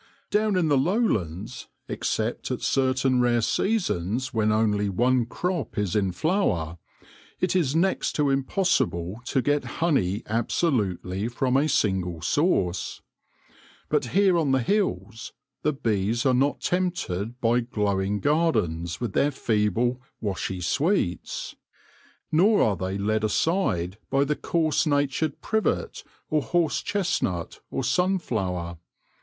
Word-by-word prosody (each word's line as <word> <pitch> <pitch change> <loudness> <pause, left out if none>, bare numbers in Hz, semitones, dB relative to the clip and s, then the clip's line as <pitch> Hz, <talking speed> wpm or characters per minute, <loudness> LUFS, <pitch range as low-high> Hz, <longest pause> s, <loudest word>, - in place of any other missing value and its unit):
Down 210 -1 +2
in 175 -3 +2
the 145 -3 +3
lowlands, 125 - -1 0.2
except - - -2
at - - -3
certain 130 -1 +2
rare 120 -1 +3
seasons 130 - 0
when 110 -2 +2
only 105 -2 +1
one 120 +4 +2
crop 175 -1 -3
is 105 -3 -1
in 100 -3 +1
flower, 90 - 0 0.6
it 185 0 0
is 155 -6 +1
next 185 +3 +1
to 145 -2 +1
impossible 130 - 0
to 130 0 0
get 145 0 +1
honey 125 - +1
absolutely 105 - 0
from 125 +2 0
a 145 +3 +3
single 95 - 0
source. 95 - 0 0.9
But - - +1
here 185 +5 +3
on 155 -4 +1
the 130 -2 +2
hills 115 - -1 0.3
the 150 - +2
bees 115 -3 -1
are 130 - +4
not 135 +3 +1
tempted 125 - -2
by 120 +1 +3
glowing 105 -4 -1
gardens 90 - +1
with 120 -5 -3
their 145 - +3
feeble, 120 0 0 0.2
washy 95 -3 -3
sweets; 145 - -1 0.8
nor 200 +7 +4
are 105 - +2
they 95 +2 -3
led 110 +2 0
aside 105 - 0
by 135 +1 +3
the 150 +2 0
coarse 160 0 0
natured 145 +1 0
privet, 220 -1 -1 0.2
or 155 -1 +1
horse 170 0 0
chestnut, 100 - -2
or - - -2
sunflower. 110 - -1
125 Hz, 125 wpm, -25 LUFS, 100-155 Hz, 0.9 s, are